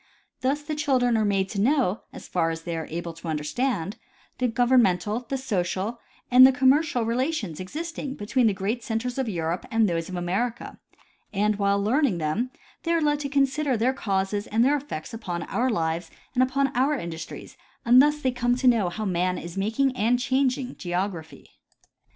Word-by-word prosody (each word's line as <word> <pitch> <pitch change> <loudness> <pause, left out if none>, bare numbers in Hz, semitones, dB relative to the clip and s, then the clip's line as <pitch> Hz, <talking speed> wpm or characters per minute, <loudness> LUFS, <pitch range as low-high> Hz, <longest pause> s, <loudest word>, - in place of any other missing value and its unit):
Thus 275 +3 0
the 305 +1 -4
children 260 -5 +2
are 220 - +2
made 195 -2 +1
to 200 -1 -2
know 245 -5 +2
as - - -10
far 165 -2 +1
as 165 0 -5
they 170 -1 -3
are 160 -1 -4
able 170 +1 -5
to 165 +1 -10
understand, 165 - -2 0.4
the 250 - +2
governmental, 235 -2 +2
the 270 - -1
social, 205 -2 -2 0.3
and 250 +1 +9
the 260 - +9
com 260 0 +4
mercial 285 -5 +1
relations 235 - -1
existing 295 - -5
between 235 +4 +1
the 210 - +2
great 215 +6 -2
centers 240 +3 -2
of 260 -4 -1
Europe 170 -2 -2
and 225 0 +2
of - - +4
those 165 0 -2
of 185 - -5
America, 195 +8 -2 0.5
and 210 0 +1
while 200 0 +2
learning 230 - +2
them 170 +11 -1 0.3
they 335 - 0
are 335 - +3
led 295 -2 +1
to 285 -1 -3
consider 275 -1 +1
their 245 +4 +2
causes 200 -3 -1
and 225 +3 +2
their 285 +2 +4
effects 270 - -6
upon 180 -7 -4
our 255 +2 0
lives 165 -5 -1 0.2
and 255 - +2
upon 270 +1 +1
our 270 +4 +2
industries, 165 -5 -7 0.3
and 245 +2 +8
thifs 295 +1 +2
they 260 - +2
come 245 0 +1
to 255 +1 0
know 225 -7 +4
how 215 +5 -4
man 180 -1 0
is 170 0 -7
making 225 +7 0
and 240 +1 +2
changing 260 0 0
geograjDhy. 175 -2 -4
230 Hz, 190 wpm, -25 LUFS, 185-260 Hz, 0.5 s, and